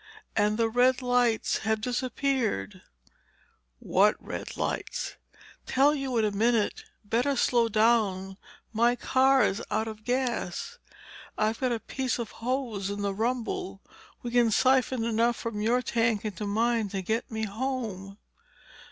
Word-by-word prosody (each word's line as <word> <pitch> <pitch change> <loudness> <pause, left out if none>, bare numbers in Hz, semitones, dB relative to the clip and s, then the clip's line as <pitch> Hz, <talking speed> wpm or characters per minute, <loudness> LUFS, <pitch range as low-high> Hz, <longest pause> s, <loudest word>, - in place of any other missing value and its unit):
And 210 0 +2
the 230 -1 +2
red 250 +3 +2
lights 245 -2 +2
have 220 0 0
disappeared." 250 - -1 1.0
"What - - +3
red - - -7
lights?" - - -3 0.5
"Tell 275 +3 +4
you 270 -4 -2
in 220 - +3
a 210 - 0
minute. 230 - +1 0.2
Better 245 +6 +1
slow 240 -2 +2
down. 210 -4 +2 0.4
My 235 +2 +3
car's 260 -3 +3
out 220 +1 0
of 215 -1 -8
gas. 245 -7 -2 0.6
I've 215 +1 0
got 255 -2 0
a 235 - -1
piece 260 +2 -2
of 235 -3 -5
hose 235 -5 -3
in 205 0 -4
the 200 -1 0
rumble. 250 - -2 0.4
We 240 - -4
can 240 -1 +4
siphon 255 +1 +2
enough 230 +1 +2
from 220 -3 -4
your 240 +4 +2
tank 230 -3 0
into 210 0 -4
mine 225 +1 +1
to 195 -1 -4
get 220 +5 -2
me 220 -1 -3
home." 210 -4 -4
230 Hz, 140 wpm, -28 LUFS, 215-250 Hz, 1.0 s, Tell